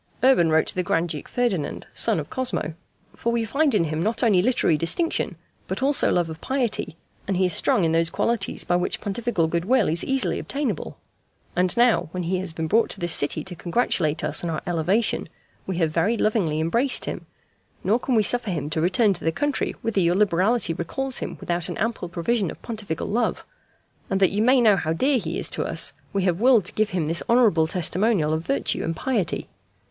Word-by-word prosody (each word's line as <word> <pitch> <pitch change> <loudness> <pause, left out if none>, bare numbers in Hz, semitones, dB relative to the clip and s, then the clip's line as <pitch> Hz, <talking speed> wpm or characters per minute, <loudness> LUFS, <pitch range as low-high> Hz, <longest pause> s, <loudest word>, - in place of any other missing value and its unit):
Urban 255 -11 +5
wrote 160 0 +3
to - - 0
the 185 - -1
Grand 175 -1 0
Duke 150 -2 -5
Ferdinand, 230 -11 -2
son - - +3
of - - -5
Cosmo: 250 -11 -2 0.4
"For 235 - -2
We 235 -1 0
find 280 +3 +1
in 190 - +3
him 155 0 -2
not 220 +7 -1
only 205 -6 +4
literary 210 -7 +2
distinction 165 - 0 0.3
but - - -4
also 280 +1 +3
love 175 -2 +1
of 160 -1 -9
piety, 245 - -2 0.3
and 195 -2 0
he 185 - +2
is 180 - +1
strong 190 - +2
in 165 - +2
those 165 0 +3
qualities 230 -1 -1
by 175 - +1
which 180 - -2
Pontifical 205 -4 -1
good 170 +1 -1
will 250 -2 +3
is 165 +2 +1
easily 270 -1 0
obtainable. 275 - -4 0.6
And 180 +3 +1
now, 240 -1 +3
when 180 -1 -3
he 180 +2 -1
has 185 -2 -4
been 160 0 -4
brought 220 +8 +2
to - - +1
this 175 -1 +1
city 145 - +3
to 185 -2 -7
congratulate 170 -4 0
Us - - 0
on 170 - -2
Our 155 - -3
elevation, 175 +7 0 0.4
We 190 -2 -3
have 165 -3 +1
very 200 +8 +1
lovingly 190 -10 0
embraced 235 - +1
him; - - -6 0.6
nor 215 +5 +2
can 255 0 -1
We 215 - +4
suffer 240 +1 0
him 155 -4 -3
to 155 - -1
return 195 +5 +3
to 175 - -8
the 165 - +1
country 290 - -2
whither 220 -4 0
your 175 0 +2
liberality 195 0 +2
recalls 260 +11 -1
him - - -5
without 175 -2 -1
an - - -5
ample 225 -5 -2
provision 185 +3 -1
of - - -9
Pontifical 210 -8 -4
love. 235 +4 -1 0.6
And 195 - 0
that 190 - +4
you 205 +2 0
may 250 +3 +4
know 215 -4 +5
how 160 -2 -1
dear 260 - +2
he - - -4
is - - -3
to - - 0
Us, - - -1 0.2
We 195 -1 -1
have 180 0 0
willed 240 -6 +5
to - - -3
give 215 0 0
him 180 -6 -1
this 165 +3 0
honourable 220 -10 +4
testimonial 180 -1 +1
of 160 +1 -2
virtue 275 - -1
and 165 - -2
piety. 220 -3 -2
190 Hz, 215 wpm, -23 LUFS, 165-235 Hz, 0.6 s, Urban